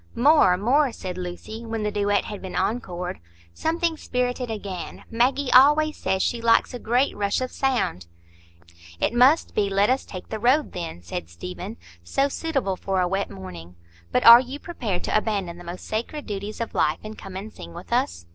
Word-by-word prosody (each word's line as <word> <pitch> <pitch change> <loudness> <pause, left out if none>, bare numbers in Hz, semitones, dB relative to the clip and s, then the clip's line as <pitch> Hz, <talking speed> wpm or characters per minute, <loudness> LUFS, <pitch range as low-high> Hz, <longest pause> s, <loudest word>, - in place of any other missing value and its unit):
"More, 255 - +5
more!" 260 +7 +3
said 185 -5 -6
Lucy, 180 +5 -7
when 225 -1 -3
the 210 - -1
duet 205 0 +1
had 205 -2 -7
been 190 - -7
encored. 180 -6 -2 0.3
"Something 330 0 -1
spirited 250 -2 -2
again. 200 -5 -6
Maggie 255 +3 +1
always 300 +4 +6
says 190 0 0
she 235 - -1
likes 230 +2 +3
a 245 - -5
great 245 +5 +1
rush 200 -1 0
of 255 0 -3
sound." 225 - -1 0.9
"It - - +1
must 255 +6 +4
be 205 -2 +1
'Let 200 +4 +3
us 265 - +1
take 185 -2 -9
the 220 - -4
road,' 260 +7 +2
then," 165 - -6
said 85 -1 -6
Stephen,—"so 85 - -4
suitable 270 - -2
for 190 0 -1
a 180 - +2
wet 195 +2 -1
morning. 90 -3 -10 0.4
But - - +1
are 235 +1 +12
you 260 +2 -7
prepared 235 - -4
to - - -1
abandon 200 -5 -1
the - - -10
most 175 +1 -8
sacred 240 +7 -4
duties 205 +1 -5
of 230 - -4
life, 155 +1 +2
and 215 0 -7
come 195 -3 -10
and 205 +3 -7
sing 85 0 -10
with - - -7
us?" 85 0 0
210 Hz, 185 wpm, -24 LUFS, 180-250 Hz, 0.9 s, are